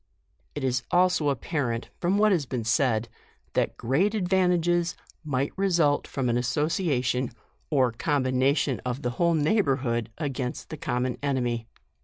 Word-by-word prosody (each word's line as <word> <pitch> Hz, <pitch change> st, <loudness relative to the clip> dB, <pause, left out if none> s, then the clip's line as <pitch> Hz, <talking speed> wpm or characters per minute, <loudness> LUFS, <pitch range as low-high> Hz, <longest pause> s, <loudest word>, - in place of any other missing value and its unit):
It 145 Hz, -, -4 dB
is 125 Hz, -1 st, +1 dB
also 180 Hz, -4 st, +3 dB
apparent 125 Hz, -3 st, -2 dB
from 185 Hz, +3 st, +1 dB
what 215 Hz, 0 st, +4 dB
has 160 Hz, -8 st, +1 dB
been 125 Hz, -3 st, -3 dB
said, 115 Hz, 0 st, +1 dB, 0.5 s
that -, -, 0 dB
great 175 Hz, -, +1 dB
advantages 175 Hz, -3 st, +2 dB, 0.3 s
might 140 Hz, -2 st, -1 dB
result 170 Hz, -7 st, +2 dB
from 135 Hz, -2 st, -2 dB
an 120 Hz, 0 st, +2 dB
association 130 Hz, -2 st, 0 dB, 0.4 s
or 130 Hz, -5 st, +3 dB
combination 130 Hz, +1 st, +1 dB
of 125 Hz, +3 st, -3 dB
the 125 Hz, -, 0 dB
whole 170 Hz, +7 st, +2 dB
neigh 160 Hz, +8 st, +3 dB
borhood 130 Hz, -, 0 dB
against 135 Hz, -5 st, -4 dB
the 155 Hz, -, -5 dB
common 125 Hz, -5 st, -2 dB
enemy. 120 Hz, -5 st, -1 dB
140 Hz, 140 wpm, -26 LUFS, 125-170 Hz, 0.5 s, what